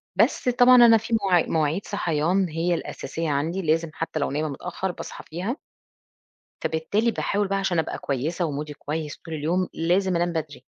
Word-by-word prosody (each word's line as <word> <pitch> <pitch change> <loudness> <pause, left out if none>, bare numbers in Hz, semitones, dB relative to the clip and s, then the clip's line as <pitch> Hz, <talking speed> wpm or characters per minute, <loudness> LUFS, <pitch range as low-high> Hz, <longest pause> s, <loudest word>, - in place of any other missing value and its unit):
بس - - +2
طبعًا 245 +1 +6
أنا 235 -2 +8
في 225 +1 0
مواعيد 180 -4 +3
مواعيد 160 +4 0
صحيان 170 +4 0
هي 165 +3 0
الأساسية 165 -1 -4
عندي 155 +6 -1
لازم 165 0 +1
حتى 160 -1 -3
لو 140 - -1
نايمة 150 +2 -1
متأخر 180 +6 -4
باصحى - - -8
فيها، 185 - -3 1.1
ف - - +4
بالتالي 200 +9 0
باحاول 205 -2 -1
بقى 195 0 0
عشان 195 -3 0
أبقى 160 - -1
كويسة 150 +6 -2
ومودي 150 -1 -4
كويس 150 +1 -4
طول 165 - -8
اليوم 170 +5 0
لازم 180 +2 +1
أنام 175 0 +1
بدري 150 -5 -5
170 Hz, 170 wpm, -25 LUFS, 155-195 Hz, 1.1 s, أنا